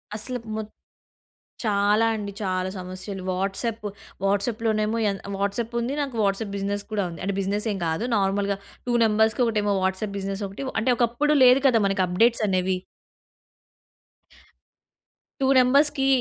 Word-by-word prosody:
అసల 250 +4 -1 0.2
మొత్ 215 -1 -5 1.0
చాలా 210 +1 +3
అండి. 205 -2 -5
చాలా 185 -1 -1
సమస్యలు. 185 +2 -6
వాట్సాప్. 200 +4 -2 0.4
వాట్సాప్‌లోనేమో 215 +2 0
ఎన్ 195 -1 -3 0.2
వాట్సాప్పుంది. 235 +5 -2
నాకు 275 -4 -4
వాట్సాప్ 200 +1 -1
బిజినెస్ 200 +1 -2
కూడా 210 -2 0
ఉంది. 170 - -9
అంటే, 200 - -1
బిజినె‌‌సేం 205 +2 -1
కాదు, 160 +6 -1
నార్మల్‌గా 200 0 0 0.3
2 240 - +1
నంబర్స్‌కి, 220 +2 +2
ఒకటేమో 210 -3 +1
వాట్సాప్ 190 +2 -2
బిజినెసొకటి. 195 +3 -4
ఒ - - -9
అంటే, 250 - +2
ఒకప్పుడు 245 +5 +2
లేదు 255 +2 +7
కదా 240 -4 +4
మనకి 195 -1 +1
అప్డేట్సనేవి. 190 -2 +2 2.6
2 265 - +3
నంబర్స్‌కీ 270 +2 +4
205 Hz, 120 wpm, -24 LUFS, 195-230 Hz, 2.6 s, లేదు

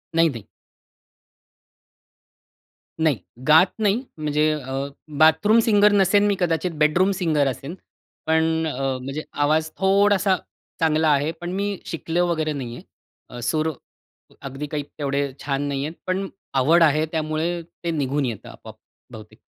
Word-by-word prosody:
नाही-नाही. 160 -10 +2 2.6
नाही 155 -5 +2 0.3
गात 160 +5 +7
नाही, 215 +3 +1
म्हणजे 150 0 +1
अ, 135 -2 -3 0.3
बाथरूम 160 +9 +5
सिंगर 210 -2 +5
नसेन 200 0 +4
मी 200 - +2
कदाचित 175 0 0
बेडरूम 165 +6 +3
सिंगर 155 -5 +2
असेन 135 +5 -5 0.5
पण 160 0 +3 0.2
अ, 155 - -3 0.3
म्हणजे 135 +4 -5
आवाज 155 +2 +1
थोडासा 195 0 +3 0.4
चांगला 160 -1 +2
आहे, 145 +2 +2
पण 175 +2 -7
मी 200 +1 -2
शिकलो 165 +2 -1
वगैरे 155 -3 -1
नाही 125 -4 -6
आहे. 120 0 -14
सूर 155 +7 0 0.7
अगदी 135 +2 -6
काही 145 0 -3
तेवढे 140 -1 -3
छान 140 -1 -1
नाही 140 -1 -2
आहेत. 160 - -6
पण 190 +1 -1 0.3
आवड 155 +6 +4
आहे, 155 0 +3
त्यामुळे 160 +2 -2 0.2
ते 170 - -1
निघून 145 -2 -1
येतं 115 -5 -5
आपोआप. - - -12 0.4
बहुतेक. 110 -2 -12
155 Hz, 130 wpm, -23 LUFS, 145-175 Hz, 2.6 s, गात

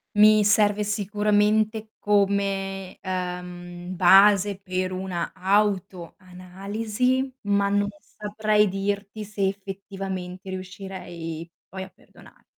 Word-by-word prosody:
mi 215 0 +7
serve 210 0 +3
sicuramente 210 +1 +1
come, 195 -2 0
uhm, 180 -1 -5
base 195 +2 +6
per 185 -1 -2
una 185 -2 -3
autoanalisi, 200 +5 -1
ma 200 -1 +1
non 205 0 +1
saprei 210 0 0
dirti 200 +2 -3
se 200 -1 -1
effettivamente 195 -1 -6
riuscirei 185 -3 -7 0.2
poi 190 0 -6
a 190 - -10
perdona - - -19
195 Hz, 90 wpm, -25 LUFS, 185-210 Hz, 0.2 s, mi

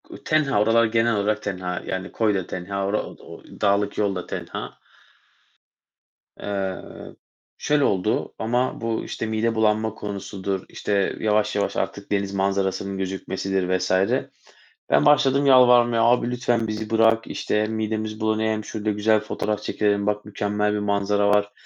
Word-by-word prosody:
U - - -8
tenha, 145 -8 +2
oralar 115 +2 +4
genel 115 0 +3
olarak 105 +1 0
tenha, 90 -3 -3 0.2
yani, 95 0 -4
koy 110 -2 +1
da - - -4
tenha, 100 +2 -4
ora 105 +2 0
o - - -10
d - - -19
o - - -11 0.2
dağlık 100 0 +1
yolda 100 -4 -1
tenha. - - -5 1.7
Eee, 95 -2 -2 0.8
şöyle 150 -1 +1
oldu, 100 0 0
ama 120 +3 -1
bu 115 -1 -2
işte - - -4
mide 110 +1 0
bulanma 110 0 +1
konusudur, 100 -2 -4
işte, 100 -2 -1
yavaş 105 -1 +1
yavaş, 100 - -1
artık 100 0 -4
deniz 100 -1 0
manzarasının 95 0 -1
gözükmesidir 95 -1 -2
vs. 95 0 -3 1.0
ben 70 +1 +4
başladım 140 -1 +4
yalvarmaya 120 -3 +6
"Abi 120 +1 +3
lütfen 120 -2 0
bizi 110 0 -4
bırak." 115 0 +3
işte, 105 0 -1
"Midemiz 110 0 -3
bulanıyor, 110 0 0
hem 110 0 -4
şurada 110 -1 -2
güzel 105 +1 +2
fotoğraf 105 0 -3
çekilelim, 100 -1 0
bak 105 0 -1
mükemmel 105 0 -1
bir 105 - -1
manzara 100 0 +1
var. 105 0 +2
105 Hz, 150 wpm, -23 LUFS, 100-110 Hz, 1.7 s, yalvarmaya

